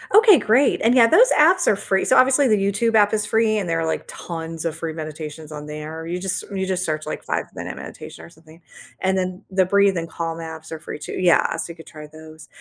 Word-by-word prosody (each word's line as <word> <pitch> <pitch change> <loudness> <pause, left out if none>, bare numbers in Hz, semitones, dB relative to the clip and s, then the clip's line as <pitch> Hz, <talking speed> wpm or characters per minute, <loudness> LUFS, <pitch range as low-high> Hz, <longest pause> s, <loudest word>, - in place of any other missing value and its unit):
Okay, 430 -4 +8
great, 235 +6 +2
and, 235 +3 +3
yeah, 235 -3 +7
those - - +5
apps 345 +4 +4
are - - +4
free 195 -1 -1
so 260 - +3
obviously, 265 +2 +4
the 215 -3 +3
YouTube 205 +4 0
app 205 -1 +4
is 210 -1 0
free, 220 0 +1
and 200 -4 -2
there 165 0 0
are, - - -1
like, 160 - -2
tons 165 -1 -7
of 165 -2 -3
free 165 -1 -5
meditations 155 0 -8
on 150 -1 -8
there, 155 +2 -7
you 175 +1 -3
just 190 0 -3
you 190 -1 -2
just 185 -1 -2
search, 155 -1 -3
like, 155 - -6
"five-minute - - -5
meditation," - - -10
or - - -12
something? 160 0 -19 0.4
And 190 0 +1
then, 185 +1 -3
the 190 0 +2
Breathe 200 0 +2
and 165 0 -3
Calm 165 0 -4
apps 160 -1 -9
are 160 - -6
free, - - -8
too 150 - -7
yeah, 180 -2 +2
so - - -5
you - - -11
could 165 - -15
try 150 -1 -11
those, 155 +1 -14
180 Hz, 245 wpm, -21 LUFS, 160-210 Hz, 0.4 s, Okay